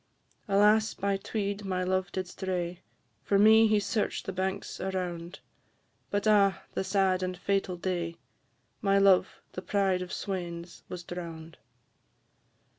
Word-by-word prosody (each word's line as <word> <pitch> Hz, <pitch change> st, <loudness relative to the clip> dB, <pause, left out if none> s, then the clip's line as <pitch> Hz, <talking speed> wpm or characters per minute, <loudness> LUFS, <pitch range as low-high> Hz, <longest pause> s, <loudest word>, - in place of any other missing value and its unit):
Alas! 210 Hz, +2 st, +4 dB
by 200 Hz, 0 st, 0 dB
Tweed 200 Hz, 0 st, -3 dB
my 185 Hz, -2 st, -1 dB
love 185 Hz, 0 st, 0 dB
did 185 Hz, -1 st, -3 dB
stray, 180 Hz, -1 st, -3 dB, 0.4 s
For 200 Hz, -, +1 dB
me 220 Hz, +2 st, +7 dB
he 215 Hz, -1 st, +3 dB
search'd 210 Hz, +1 st, -1 dB
the 190 Hz, -, -4 dB
banks 190 Hz, +1 st, -3 dB
around; 180 Hz, -2 st, -4 dB, 0.7 s
But, 205 Hz, +1 st, -1 dB
ah! 200 Hz, -2 st, +4 dB
the -, -, -1 dB
sad 190 Hz, -1 st, +2 dB
and 185 Hz, 0 st, -3 dB
fatal 195 Hz, -1 st, -1 dB
day, 175 Hz, -2 st, -2 dB, 0.7 s
My 195 Hz, -1 st, +3 dB
love, 195 Hz, -2 st, +3 dB
the 185 Hz, -, -6 dB
pride 190 Hz, -1 st, +1 dB
of 180 Hz, -, -6 dB
swains, 175 Hz, -3 st, -5 dB
was 180 Hz, -1 st, -6 dB
drown'd. 165 Hz, -2 st, -8 dB
190 Hz, 135 wpm, -29 LUFS, 180-200 Hz, 0.7 s, me